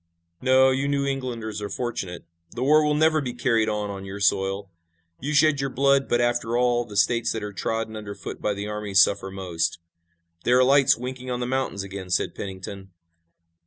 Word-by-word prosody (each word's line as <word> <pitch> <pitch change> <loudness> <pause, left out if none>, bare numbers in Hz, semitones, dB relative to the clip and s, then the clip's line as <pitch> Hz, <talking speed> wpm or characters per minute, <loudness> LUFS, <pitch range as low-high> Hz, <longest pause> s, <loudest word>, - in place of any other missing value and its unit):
"No, 130 +1 +5
you 135 +1 0
New 140 -1 0
Englanders 120 -6 -3
are 105 - -4
fortunate. 95 -6 -4 0.3
The 125 - -2
war 155 +3 +5
will 150 0 +2
never 155 0 +3
be 125 -3 -4
carried 115 -3 +1
on 105 -1 -2
on 100 -1 -7
your 95 +1 -7
soil. 95 0 0 0.5
You 145 +4 -3
shed 145 -1 +4
your 135 - -1
blood, 140 +1 +2
but, 120 - +2
after 120 -1 0
all, 120 -1 +2
the 105 -3 -8
states 115 +5 +2
that 110 - -4
are 105 -1 -5
trodden 110 +3 -3
under 105 -2 -7
foot 100 - -8
by 105 - 0
the 100 +1 -5
armies 105 -2 0
suffer 95 +1 +3
most." 85 -4 -2 0.7
"There 125 +1 +4
are 130 - +6
lights 135 +1 +5
winking 130 +1 -6
on 125 -1 -2
the 125 - -2
mountains 130 -6 -2
again," 95 -1 -7
said 90 - 0
Pennington. 95 0 -7
115 Hz, 200 wpm, -24 LUFS, 100-130 Hz, 0.7 s, are